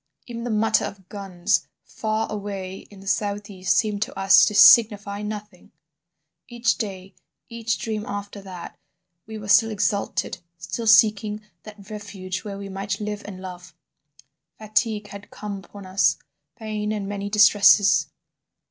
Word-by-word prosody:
"Even 235 -2 -7
the - - -3
mutter 220 0 +2
of 190 -2 -9
guns 195 -1 -1 0.2
far 220 0 -2
away 195 -2 -6
in 200 -2 -14
the 195 - -13
south 205 0 -1
east 185 -1 0
seemed 210 -2 0
to 220 - -3
us 195 0 +7
to 210 - -2
signify 205 -2 +6
nothing... 210 -3 -8 0.8
"Each 240 -1 0
day, 195 -3 -6 0.4
each 230 -3 -2
dream 215 +3 -3
after 205 0 -6
that, 185 -3 -10 0.5
we 220 0 -7
were 205 -1 -8
still 225 +2 +5
exalted, 205 -2 -1 0.2
still 225 +6 -5
seeking 215 0 +4 0.2
that 205 -2 -12
refuge 200 -3 -6
where 205 -2 -7
we 200 0 -7
might 195 0 -4
live 210 0 -4
and 195 -3 -8
love. 180 -1 -9 0.8
Fatigue 215 -1 -1
had 200 0 -10
come 205 -1 -6
upon 195 +1 -12
us, 190 +1 +2 0.4
pain 215 -1 -4
and 205 -2 -3
many 200 0 -4
distresses. 205 -1 +5
205 Hz, 150 wpm, -23 LUFS, 195-215 Hz, 0.8 s, us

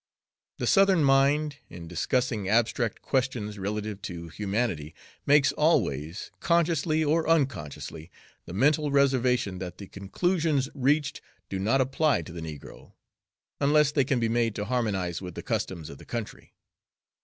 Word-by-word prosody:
The - - -2
Southern 195 -4 +4
mind, 140 +2 +3
in 85 -1 -9
discussing 105 +3 -1
abstract 115 0 +1
questions 120 -6 -1
relative 105 +1 -4
to 85 -4 -7
humanity, 95 -5 -2 0.3
makes 145 0 +5
always, 85 - 0
consciously 165 -2 +2
or 160 +2 +1
unconsciously, 90 - -1 0.4
the 85 - -7
mental 145 +7 +2
reservation 125 -7 +2
that 90 -1 -6
the 100 - -8
conclusions 145 - -1
reached 140 +2 +1 0.3
do 95 - -3
not 115 +8 +2
apply 135 - +1
to 80 - -10
the 85 0 -7
negro, 75 -3 -10 0.7
unless 150 +1 +4
they 145 -2 +2
can 130 -1 0
be 115 - +1
made 115 -1 0
to 105 - -3
harmonize 100 -9 -1
with 90 -2 -7
the - - -6
customs 85 -5 -3
of 70 - -10
the - - -13
country. 115 -3 -7
120 Hz, 145 wpm, -27 LUFS, 95-145 Hz, 0.7 s, makes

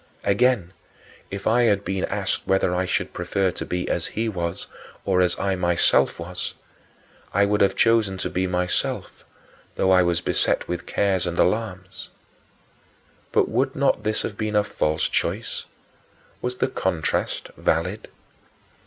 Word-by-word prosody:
Again, 100 -3 +2 0.6
if 100 0 -6
I 120 +2 +4
had 100 -3 +2
been 95 -1 -1
asked - - -2
whether 95 -2 +2
I 90 +1 0
should - - -1
prefer 90 +2 0
to - - -5
be 90 0 -2
as 85 - -1
he 115 +1 -2
was 85 -4 -3 0.4
or 95 -1 +3
as 90 -1 +2
I 95 0 0
myself 85 -2 +2
then - - -6
was, - - -5 0.8
I 100 +1 +5
would 105 0 +1
have 100 - +4
chosen 115 -4 +3
to - - -3
be 95 +1 0
myself; 90 0 -2 0.5
though 95 - +2
I 90 -1 +6
was 85 -1 +2
beset - - 0
with 90 -1 -4
cares 95 -3 +1
and 85 0 -3
alarms. 95 -2 -1 1.2
But - - +3
would - - 0
not - - +2
this 110 0 -1
have 105 - -4
been 110 -1 -1
a 105 - +4
false 75 -6 0
choice? - - -2 0.8
Was 125 0 -3
the - - +1
contrast 95 -10 -1
valid? 90 +7 -1
95 Hz, 155 wpm, -24 LUFS, 90-105 Hz, 1.2 s, I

